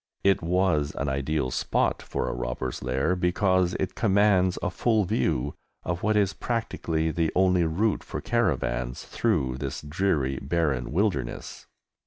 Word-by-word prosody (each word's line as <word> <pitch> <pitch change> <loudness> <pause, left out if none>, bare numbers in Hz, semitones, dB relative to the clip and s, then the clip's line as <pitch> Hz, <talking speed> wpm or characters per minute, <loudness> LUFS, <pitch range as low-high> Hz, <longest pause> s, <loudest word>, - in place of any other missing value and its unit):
It 100 0 +3
was 85 -4 +1
an 70 - -1
ideal 70 0 -1
spot - - 0
for - - -3
a - - -2
robber's - - -4
lair, 65 +8 0
because 90 0 +2
it 95 - -2
commands 100 -4 +3
a 100 - 0
full 110 +3 +2
view 70 - 0 0.3
of 90 +1 -3
what 110 0 +2
is 100 -1 +2
practically 85 -9 -2
the 80 -1 0
only 90 -2 +4
route 100 +7 0
for - - -5
caravans 65 - -1
through 65 -1 0
this 70 0 -4
dreary 75 -4 0
barren 70 -5 0
wilderness. 80 - -2
85 Hz, 145 wpm, -26 LUFS, 70-95 Hz, 0.3 s, only